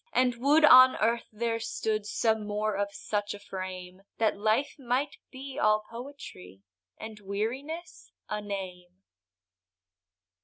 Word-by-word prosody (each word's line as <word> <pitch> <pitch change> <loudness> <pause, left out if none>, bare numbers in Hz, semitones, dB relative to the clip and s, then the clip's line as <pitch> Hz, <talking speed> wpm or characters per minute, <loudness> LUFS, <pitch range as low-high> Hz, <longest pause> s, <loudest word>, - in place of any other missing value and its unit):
and 250 -2 +2
would 290 +5 +5
on 255 -2 +9
earth 230 +2 0
there 230 +1 -2
stood, 215 -1 -2
Some 220 -1 0
more 210 0 -1
of 200 0 -1
such 205 0 -3
a - - -11
frame, 185 -2 -7 0.2
That 220 -1 +2
life 220 +7 0
might 265 +3 -1
be 270 +1 -8
all 215 -2 +3
poetry, 230 - -10 0.3
And 220 -1 -9
weariness 255 - -5 0.2
a 210 0 -3
name. 185 -2 -7
215 Hz, 125 wpm, -29 LUFS, 200-255 Hz, 0.3 s, on